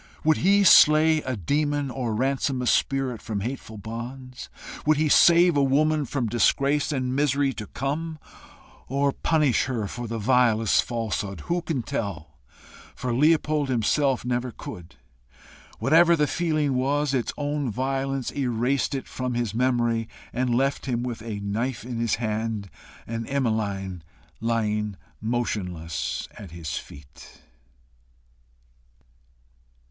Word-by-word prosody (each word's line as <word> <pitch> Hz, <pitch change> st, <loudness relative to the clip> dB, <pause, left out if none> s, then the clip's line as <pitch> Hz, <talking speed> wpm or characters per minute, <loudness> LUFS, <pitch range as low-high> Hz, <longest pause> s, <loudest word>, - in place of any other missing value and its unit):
Would 155 Hz, 0 st, +4 dB
he 200 Hz, +3 st, +4 dB
slay 155 Hz, -3 st, +7 dB
a 130 Hz, -2 st, -3 dB
demon, 145 Hz, -, 0 dB
or 120 Hz, -4 st, -2 dB
ransom 135 Hz, +2 st, 0 dB
a -, -, -2 dB
spirit 130 Hz, -2 st, +1 dB
from 105 Hz, -3 st, -4 dB
hateful 115 Hz, -1 st, -5 dB
bonds? 125 Hz, +4 st, -7 dB, 0.3 s
Would 155 Hz, 0 st, +3 dB
he 155 Hz, 0 st, +2 dB
save 170 Hz, +2 st, +6 dB
a 140 Hz, -, +3 dB
woman 150 Hz, +2 st, +2 dB
from 130 Hz, -1 st, -2 dB
disgrace 140 Hz, +6 st, +2 dB
and 130 Hz, -2 st, -1 dB
misery 140 Hz, -1 st, +1 dB
to 105 Hz, -4 st, -7 dB
come? 155 Hz, +4 st, -3 dB, 0.7 s
or 140 Hz, +2 st, +1 dB
punish 150 Hz, -3 st, +1 dB
her 120 Hz, -5 st, -2 dB
for 120 Hz, +4 st, -6 dB
the 115 Hz, +1 st, -4 dB
vilest 115 Hz, -1 st, +3 dB
falsehood? 110 Hz, -4 st, -3 dB
Who 175 Hz, 0 st, -1 dB
can 155 Hz, -7 st, -2 dB
tell? 85 Hz, -10 st, -5 dB, 0.6 s
for 125 Hz, -1 st, -3 dB
Leopold 150 Hz, +1 st, +2 dB
himself 130 Hz, +2 st, +1 dB
never 125 Hz, 0 st, -1 dB
could. 90 Hz, -, -10 dB, 0.8 s
Whatever 165 Hz, +8 st, +5 dB
the 150 Hz, -2 st, +2 dB
feeling 155 Hz, -2 st, 0 dB
was, 140 Hz, +2 st, 0 dB
its 125 Hz, -3 st, 0 dB
own 145 Hz, -2 st, -1 dB
violence 135 Hz, +2 st, -2 dB
erased 130 Hz, +2 st, 0 dB
it 135 Hz, -, -5 dB
from 125 Hz, -1 st, -3 dB
his 120 Hz, -4 st, -1 dB
memory, 120 Hz, -2 st, +1 dB, 0.2 s
and 125 Hz, -1 st, 0 dB
left 135 Hz, +2 st, 0 dB
him 120 Hz, -2 st, -1 dB
with 120 Hz, -3 st, -4 dB
a 110 Hz, -2 st, -5 dB
knife 110 Hz, +5 st, -2 dB
in 120 Hz, -1 st, -5 dB
his 115 Hz, -2 st, +1 dB
hand, 110 Hz, -2 st, -3 dB, 0.3 s
and 115 Hz, 0 st, -4 dB
Emmeline 105 Hz, -9 st, -1 dB, 0.4 s
lying 105 Hz, -2 st, -1 dB, 0.3 s
motionless 95 Hz, -8 st, -3 dB
at 100 Hz, -, -9 dB
his 80 Hz, -2 st, -6 dB
feet. 70 Hz, +2 st, -11 dB
125 Hz, 130 wpm, -25 LUFS, 110-140 Hz, 0.8 s, slay